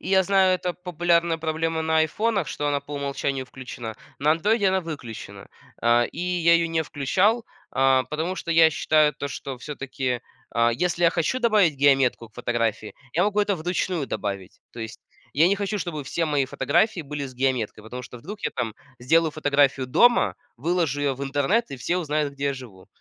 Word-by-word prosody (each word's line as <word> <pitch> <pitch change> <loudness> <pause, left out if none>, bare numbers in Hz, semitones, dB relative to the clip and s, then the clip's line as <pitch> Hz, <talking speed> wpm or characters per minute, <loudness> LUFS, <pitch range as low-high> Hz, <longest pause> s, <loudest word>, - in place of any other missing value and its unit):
и - - -7
я 190 -1 +4
знаю 190 -1 +4
это 180 -1 -3
популярная 170 -2 +1
проблема 160 0 -1
на 160 0 +2
айфонах, 205 +7 +1
что 145 - -3
она 145 -1 +1
по 145 - -9
умолчанию 140 -1 -2
включена, 125 -4 -8 0.2
на 150 +2 +3
андроиде 205 +6 +2
она 190 0 +2
выключена. 115 - -8 0.3
Э, 120 +1 +4
и - - -12
я 175 -1 +3
ее 170 0 +3
не 165 -1 0
включал, 185 - +1 0.3
э, 135 -1 +4
потому 160 +5 -2
что 170 - -5
я 165 -1 +7
считаю 155 -1 +3
то, 140 - -4
что 135 -1 -6
всё-таки, 130 -3 -3 0.3
э, 115 0 +4
если 175 +4 0
я 170 - +6
хочу 175 +10 0
добавить 215 - +3
геометку 135 -4 +3
к 110 - -36
фотографии, 115 -3 -2 0.2
я 175 - +2
могу 205 +1 +1
это 205 -1 +2
вручную 175 -2 -2
добавить. 100 -2 -5
То 120 - -8
есть 110 0 -7 0.3
я 160 +4 +5
не 200 - +3
хочу, 205 +1 -2
чтобы 170 -6 -4
все 165 +5 -2
мои 145 -3 +1
фотографии 215 - +1
были 145 -1 -5
с 130 - -8
геометкой, 125 -5 -1
потому 125 +3 -7
что 125 - -10
вдруг 200 - -9
я - - -1
там 115 -3 -3 0.2
сделаю 160 +6 +3
фотографию 145 -3 +2
дома, 240 - +4 0.2
выложу 160 +1 0
ее 140 -2 +1
в 135 - -8
интернет, 145 +10 +1
и 135 - -5
все 170 +8 -1
узнают 150 -4 -1
где 140 +1 -2
я 140 - 0
живу. 115 -8 -12
150 Hz, 195 wpm, -24 LUFS, 130-175 Hz, 0.3 s, я